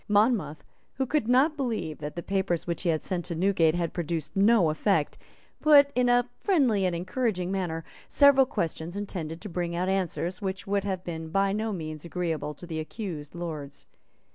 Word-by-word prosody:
Monmouth, 205 - +2 0.3
who 265 - 0
could 270 -3 0
not 265 +6 +4
believe 235 - -3
that 150 0 -6
the 170 - -5
papers 190 -3 -1
which 170 -2 -3
he 180 - 0
had 155 -2 0
sent 180 -2 -2
to 170 - -4
Newgate 170 -2 +3
had 170 -2 -2
produced 165 -2 -3
no 200 -4 +4
effect, 155 -1 +1 0.5
put, 285 -2 +7
in 250 0 +2
a 245 0 +3
friendly 255 - +2
and 175 - -1
encouraging 185 0 -1
manner, 175 -4 -2 0.2
several 280 -2 +6
questions 170 - -3
intended 170 -5 -5
to 210 - -6
bring 175 -2 -3
out 180 +2 0
answers 185 -1 -1
which 190 -1 -3
would 200 0 0
have 190 -2 -2
been 160 -2 -5
by 195 +3 +1
no 220 +1 -1
means 155 -5 -5
agreeable 165 -3 -3
to 175 - -10
the 160 -2 -4
accused 155 -3 -6
Lords. 155 -5 -6
185 Hz, 185 wpm, -27 LUFS, 165-215 Hz, 0.5 s, put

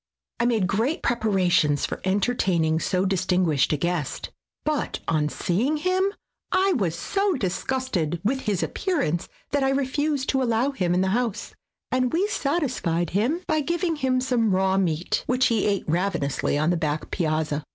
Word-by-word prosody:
I 235 - +2
made 225 -6 +2
great 225 - 0
preparations 190 -10 +2
for - - -5
entertaining 190 -5 +1
so 185 +3 0
distin 185 -1 +1
guished 145 -5 +2
a 150 - +1
guest, 170 -1 -2 0.3
but 305 -1 -1
on 150 -2 +1
seeing 235 - 0
him 370 +4 +1 0.4
I 385 0 +3
was 175 - -1
so 395 - 0
disgusted 195 - -1
with 265 +6 +1
his 205 -7 -1
appearance 285 - -1 0.2
that 285 -1 +1
I 270 - +3
refused 280 +1 0
to 265 - +2
allow 240 +2 +1
him 180 -10 0
in 180 - +2
the 190 - +1
house, 230 0 -1 0.4
and 255 -1 +1
we 355 +5 +2
satisfied 255 - -1
him 240 - +1
by 310 -3 +1
giving 340 +2 -1
him 260 -2 +1
some 245 -4 +1
raw 190 0 +2
meat, 175 -3 0
which 255 0 +2
he 230 -2 +1
ate 200 -2 -1
ravenously 160 -5 0
on 155 +3 +2
the 175 - +1
back 155 -1 -2
piazza. 155 -3 -1
210 Hz, 165 wpm, -25 LUFS, 175-270 Hz, 0.4 s, I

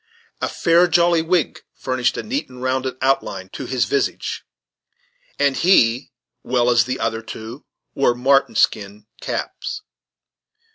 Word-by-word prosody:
A - - -1
fair, 170 +1 +3
jolly 170 -1 +3
wig 170 -1 0
furnished 130 -1 -1
a - - -3
neat 265 +6 -3
and 125 -1 -12
rounded 130 0 -1
outline 130 -8 0
to - - -7
his 130 -2 0
visage, 140 - -2 0.9
and 140 -1 +2
he, 125 -9 +3 0.3
well 125 0 +1
as 120 -2 +4
the 130 +1 -3
other 110 0 -1
two, 115 +4 -9 0.3
wore 125 -3 +2
marten 135 +3 +2
skin 105 0 0 0.2
caps. 425 - -5
130 Hz, 135 wpm, -20 LUFS, 120-160 Hz, 0.9 s, as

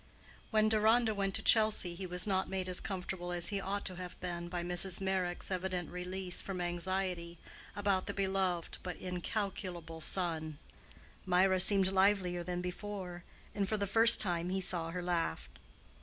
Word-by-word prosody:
When 215 -1 +3
Deronda 220 +1 +3
went 195 -2 -2
to - - -3
Chelsea 215 -5 +4
he 185 +2 -6
was 180 +2 -1
not 190 -2 0
made 190 -1 -3
as 180 -1 +1
comfortable 180 -2 -5
as 175 0 0
he 200 -1 -2
ought 200 +1 -3
to 185 - -3
have 180 0 -8
been 175 -1 -5
by 175 -1 -3
Mrs. 175 +1 +1
Meyrick's 190 -2 -2
evident 185 -1 -2
release 180 +1 -2
from 190 -2 -5
anxiety 175 0 -2 0.4
about 200 -2 0
the - - -3
beloved 190 -3 -1
but 180 -2 -6
incalculable 180 -3 -5
son. 160 -4 0 0.7
Mirah 185 +1 +3
seemed 195 0 +6
livelier 190 -2 +2
than 180 0 -3
before, 180 -1 -6 0.3
and 200 -2 -1
for 215 - 0
the 200 - -1
first 225 +3 +8
time 175 -4 +1
he 190 +1 -1
saw 175 -3 0
her 180 +1 -5
laugh. 170 - -2
185 Hz, 165 wpm, -33 LUFS, 175-195 Hz, 0.7 s, first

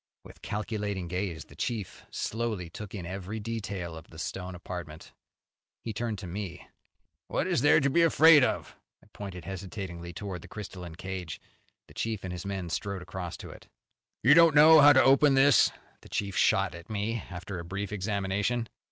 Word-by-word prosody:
With - - -15
calculating 105 -3 -3
gaze 90 -2 -3
the - - -16
chief 115 -7 -4
slowly 110 -7 -3
took 105 +2 -8
in 90 -4 -6
every 95 +4 -5
detail 100 -6 -4
of 80 - -11
the 80 - -15
stone 90 +2 -5
apartment. 85 -3 -8 0.7
He 115 - -4
turned 115 -1 -3
to 95 - -8
me. 90 -1 -6 0.6
"What - - -1
is - - +1
there 145 - +5
here - - +5
to 140 - +2
be 170 - +4
afraid 160 -2 +7
of?" - - -1 0.3
I - - -21
pointed 95 -4 -8
hesitatingly 95 -2 -6
towards 90 0 -6
the - - -12
crystalline 90 -5 -8
cage. 95 -2 -6 0.5
The - - -16
chief 110 -3 -3
and 95 -1 -4
his 90 +2 -6
men 95 -4 -4
strode 100 0 -3
across 90 -2 -6
to - - -9
it. - - -14 0.6
"You 130 +6 +7
don't 165 -1 +7
know 155 +2 +9
how 145 +1 +9
to 130 -2 +6
open 135 +1 +5
this?" 135 +1 +6 0.3
the - - -15
chief 100 -2 -2
shot - - +3
at 85 +3 -11
me 110 +2 -2
after 90 +1 -6
a - - -6
brief 95 +4 -5
examination. 105 +3 -1
100 Hz, 185 wpm, -29 LUFS, 90-115 Hz, 0.7 s, know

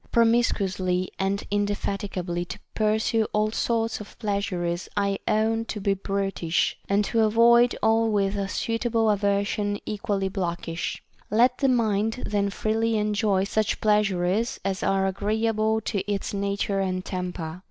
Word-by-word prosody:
Promiscuously 195 -6 +2
and 195 +1 -1
indefati 205 0 -1
gably 175 -1 -3
to - - -6 0.2
pursue 220 +1 +1
all 215 0 +1
sorts 225 -1 -1
of 210 - -12
pleasures 185 -5 -2
I 200 -1 +1
own 225 +1 +1
to 220 - -5
be 200 0 +1
brutish, 195 -4 -1
and 200 +1 +2
to 230 - 0
avoid 235 +2 +5
all 225 0 +3
with 200 -1 +1
a 200 -1 -1
suitable 230 +1 0
aversion 205 0 0
equally 205 -2 -2
blockish; 175 -3 -3 0.3
let 240 +4 +3
the 275 - +3
mind 225 -1 +1
then 200 -1 0
freely 220 +2 0
enjoy 210 -2 +1
such 215 +1 0
pleasures 210 0 +1
as 195 -1 -1
are 195 0 +1
agree 205 +4 -1
able 220 0 +1
to 205 - -2
its 200 0 -2
nature 200 0 -1
and 185 -1 -1
temper. 180 -3 -4
205 Hz, 140 wpm, -25 LUFS, 195-220 Hz, 0.3 s, avoid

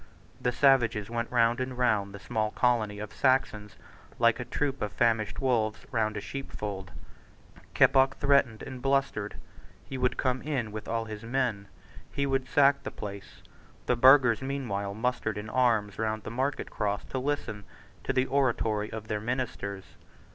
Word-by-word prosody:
The 125 - +1
savages 115 -5 +3
went 115 0 -2
round 120 0 +3
and 130 0 -3
round 110 -5 +1
the 100 - -8
small 110 0 -1
colony 110 -3 +1
of 105 0 -7
Saxons 105 -7 +1 0.4
like 115 0 +3
a 125 - -4
troop 140 +1 -2
of 105 - -2
famished 110 -3 +1
wolves 115 -5 0
round 110 -2 0
a - - -3
sheepfold. 105 -9 -6 0.9
Keppoch 135 +1 +5
threatened 140 -6 +2
and 130 -2 -8
blustered. 135 -6 0 0.5
He 135 - -6
would 125 0 +1
come 130 -1 0
in 130 -8 -2
with 110 0 -7
all 115 0 -1
his 110 -1 -7
men. 115 -4 -1 0.4
He 140 - -1
would 135 -1 0
sack 140 0 +4
the - - -5
place. 100 -2 -9 0.4
The 125 - +2
burghers 130 -1 +6
meanwhile 120 -8 -3
mustered 110 -2 -1
in 110 +1 -6
arms 110 -5 +1
round 110 -1 -1
the - - -6
market 130 +4 -2
cross 100 -1 -2
to 130 - -4
listen 130 -6 -3 0.4
to - - -1
the 130 -1 +2
oratory 115 -6 0
of 110 -1 -7
their 105 -1 -2
ministers. 110 -5 -3
115 Hz, 160 wpm, -28 LUFS, 105-130 Hz, 0.9 s, burghers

